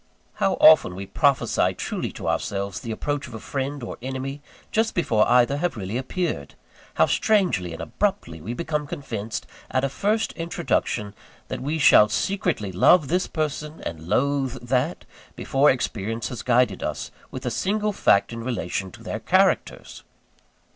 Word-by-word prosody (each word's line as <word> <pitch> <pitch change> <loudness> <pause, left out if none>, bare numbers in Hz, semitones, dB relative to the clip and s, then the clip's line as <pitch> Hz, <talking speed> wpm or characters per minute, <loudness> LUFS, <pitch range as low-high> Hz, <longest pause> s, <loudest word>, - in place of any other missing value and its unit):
How - - +2
often 90 - +6
we 100 +1 -6
prophesy 140 +7 +2
truly - - -3
to - - -6
ourselves 100 0 -2
the 115 - -8
approach 145 +6 -3
of 120 - -9
a - - -6
friend 135 +4 -4
or - - -6
enemy, 135 +2 -5 0.3
just 225 0 +1
before 110 -11 +2
either 125 +3 +4
have 175 -3 -1
really 100 +1 -4
appeared! 130 - -3 0.4
How - - +5
strangely 180 - +1
and 80 - -6
abruptly 85 - -2
we 115 +9 -5
become 150 -2 -2
convinced, 115 -9 -5 0.2
at 130 0 0
a 135 - +1
first 215 - 0
introduction, 165 - -2 0.4
that - - -4
we 150 +4 -1
shall 120 -7 +7
secretly 160 - -1
love 140 - +5
this 180 +2 +1
person 150 0 -3
and 80 -1 -6
loathe 140 +2 +1
that, 130 +7 0 0.3
before 140 +2 +3
experience 115 -2 -2
has 120 - -6
guided 125 0 +2
us - - -4 0.2
with - - -7
a - - -1
single 210 +2 0
fact 100 - +3
in 115 0 -6
relation 100 -6 -3
to - - -13
their - - -4
characters! - - +1
130 Hz, 160 wpm, -24 LUFS, 110-155 Hz, 0.4 s, shall